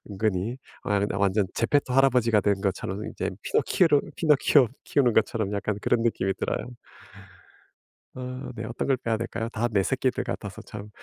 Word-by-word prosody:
은근히. 105 +3 -1 0.2
아 105 -1 +1
근데 100 0 -1
완전 100 0 +2
제페토 130 +2 +1
할아버지가 125 -5 +4
된 100 -1 +1
것처럼 95 +1 -2
이제 - - -3
피노키오를 160 -5 +3 0.2
피노키오 145 -4 +4 0.2
키우는 130 -4 +2
것처럼 110 -2 +1
약간 100 0 -1
그런 120 -1 +2
느낌이 95 -4 0
들어요. - - -3 1.5
어 125 0 -6
네. 110 - -5
어떤 115 +2 -4
걸 135 -2 +3
빼야 115 -2 -1
될까요? 115 0 -4
다 120 +1 -1
내 100 -3 +3
새끼들 130 +3 0
같아서 100 -2 -5
참. 105 0 -9
115 Hz, 360 characters per minute, -26 LUFS, 100-125 Hz, 1.5 s, 할아버지가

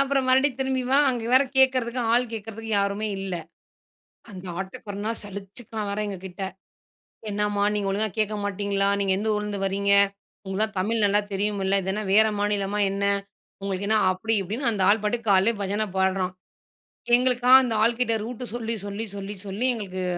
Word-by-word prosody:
அப்பறம் 275 -1 +1
மறுபடியும் 265 0 +3
திரும்பி 265 -1 0
வா! 275 - +4
அங்க 240 -2 -3
வேற 260 +2 +7
கேட்கிறதுக்கு 255 -2 +3
ஆள் 245 +1 +4
கேட்கிறதுக்கு 225 +1 -6
யாருமே 200 +2 -1
இல்ல. 190 -2 -3 1.0
அந்த 185 -1 -9 0.2
ஆட்டோக்காரன்னா 205 +3 -5
சலிச்சிக்கிறான் 205 +2 -7
வேற 200 - -3
எங்ககிட்ட. 190 -1 -7 0.9
"என்னம்மா! 205 0 0
நீங்க 200 -1 -1
ஒழுங்கா 215 +2 0
கேட்க 215 0 +1
மாட்டீங்களா! 200 0 0
நீங்க 195 -1 +2
எந்த 220 - -2
ஊர்லருந்து 210 -1 -3
வரீங்க? 200 +1 0 0.5
உங்களுக்கு 190 +3 0
தான் 215 -3 -11
தமிழ் 215 +3 0
நல்லா 205 +1 +3
தெரியும்ல்ல. 195 -1 0
இதென்ன 200 +3 -2
வேறு 220 +1 +6
மாநிலமா 205 0 0
என்ன? 200 0 -2 0.6
உங்களுக்கு 195 0 -3
என்ன?" 220 - +4
அப்பிடி 220 +5 -1
இப்பிடின்னு 230 +7 -1
அந்த 200 -4 -1
ஆள் 210 +1 +4
பாட்டுக்கு 225 +1 -1
காலையிலே 195 +4 +4
பஜன 205 +2 -1
பாடுறான். 190 -1 +1 0.8
எங்களுக்கா 250 0 +1
அந்த 245 -3 -1
ஆள்கிட்ட 230 0 +2
ரூட்டு 245 +2 -6
சொல்லி, 230 -1 -2
சொல்லி, 205 +2 -4
சொல்லி, 200 +1 -5
சொல்லி 200 +6 -1
எங்களுக்கு 185 -4 -4
210 Hz, 160 wpm, -25 LUFS, 195-230 Hz, 1.0 s, வேற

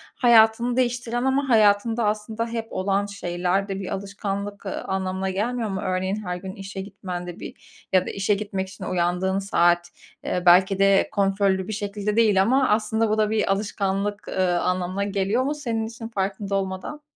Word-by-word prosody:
hayatını 235 0 +4
değiştiren 240 -1 0
ama 270 +1 +1
hayatında 220 +1 +3
aslında 215 +2 -2
hep 230 -1 -4
olan 195 +1 0
şeyler 185 -1 -1
de 195 -1 -4
bir 190 - -5
alışkanlık, 200 +1 -5
ııı, 190 - -4
anlamına 190 0 -2
gelmiyor 225 +4 -1
mu? 190 -1 -3
Örneğin, 190 +2 -1
her 180 0 -2
gün 190 +1 -7
işe 195 0 -7
gitmen 185 -2 -6
de 175 - -8
bir - - -12
ya 185 -1 +4
da - - -4
işe 200 +1 +1
gitmek 195 -2 -4
için 190 - -10
uyandığın 180 +2 0
saat, 175 -3 +2 0.4
ııı, 180 - -1
belki 185 +2 +5
de 195 0 +4
kontrollü 195 -1 +1
bir 215 - -4
şekilde 205 0 -3
değil 215 -4 +4
ama 260 +6 +3
aslında 220 +1 +1
bu 215 - +1
da 215 -1 +2
bir 215 -2 +1
alışkanlık, 200 0 -2
ııı, 180 -2 +1
anlamına 180 +2 -1
geliyor 200 +4 0
mu 290 +3 -1
senin 230 -6 -2
işin 230 0 -8
farkında 195 -2 -2
olmadan? 190 +9 -3
200 Hz, 175 wpm, -24 LUFS, 190-220 Hz, 0.4 s, belki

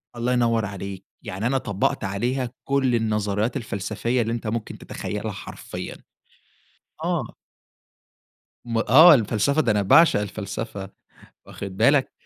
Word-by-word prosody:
الله 120 +1 0
ينور 115 -3 +2
عليك. 100 -1 -7 0.2
يعني 105 0 -3
أنا 135 +2 +1
طبّقت 100 -7 -1
عليها 120 +6 -1
كل 135 -3 +1
النظريات 105 +1 0
الفلسفية 110 +2 -2
اللي 115 0 -1
أنت 115 -1 -4
ممكن 110 0 -4
تتخيّلها - - -5
حرفيًا. - - -8 1.1
آه. - - -2 1.3
م 115 -1 -2
آه. 150 +10 +8
الفلسفة، 120 +4 +2
ده 120 - +1
أنا 105 -1 +2
باعشق 160 - +5
الفلسفة، 100 0 -5 0.6
واخِد 95 -1 -8
بالك؟ 135 +6 +3
115 Hz, 120 wpm, -24 LUFS, 100-125 Hz, 1.3 s, آه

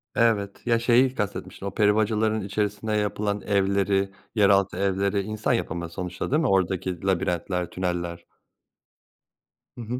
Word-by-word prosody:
Evet. 105 -2 +1
Ya 115 -1 +3
şeyi 125 +2 +3
kastetmiştim 100 -2 -4
o - - -3
peri 105 -1 +3
bacalarının 110 0 +1
içerisinde 105 +1 -2
yapılan 105 -1 -1
evleri, 100 -1 +1 0.2
yeraltı 100 -3 +3
evleri 100 +1 +1
insan 110 +4 -1
yapımı 85 -7 -2
sonuçta 90 +3 -5
değil 150 +3 +3
mi? 155 - +1
Oradaki 95 -3 0
labirentler 90 -1 -1
tüneller. 85 -2 -3 1.5
Hı - - -6
hı. 120 +3 -4
100 Hz, 130 wpm, -25 LUFS, 95-110 Hz, 1.5 s, Ya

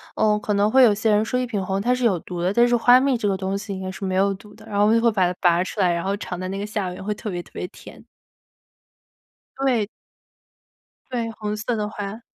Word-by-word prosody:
呃， 210 -1 +2
可 210 0 -2
能 205 +2 +2
会 265 0 +6
有 215 -4 +6
些 215 +1 +1
人 210 +1 +3
说 250 +2 -1
一 250 - 0
品 205 -5 -3
红 195 +1 -1
它 245 +3 +2
是 250 -1 -1
有 195 -6 +3
毒 175 +1 -6
的， 185 +3 +1
但 240 +2 +5
是 240 - +3
花 245 +2 +6
蜜 270 -3 +2
这 210 - -1
个 195 - +1
东 190 +1 -2
西 200 0 -6
应 190 - -6
该 185 - -4
是 195 +1 -6
没 185 0 -1
有 195 +1 +3
毒 205 +2 -15
的， 220 0 -16
然 205 -2 -4
后 205 - +5
我 - - +4
们 225 - +4
就 - - -3
会 235 - +5
把 190 -3 +2
它 180 - -9
拔 175 0 +4
出 205 - -7
来 180 -2 +3
然 170 - -2
后 195 +1 -1
尝 180 -3 -6
它 185 - -4
那 195 - -4
个 205 - -3
下 210 -3 -3
边 180 +1 -8
会 210 +1 -1
特 210 - -6
别 175 -2 -4
特 - - -21
别 180 - -4
甜。 - - -14 1.5
对。 250 -6 +1 1.2
对， 235 -2 -2
红 210 -1 -4
色 230 +3 -2
的 210 -1 -2
花。 210 +2 -6
210 Hz, 300 characters per minute, -23 LUFS, 190-225 Hz, 1.5 s, 会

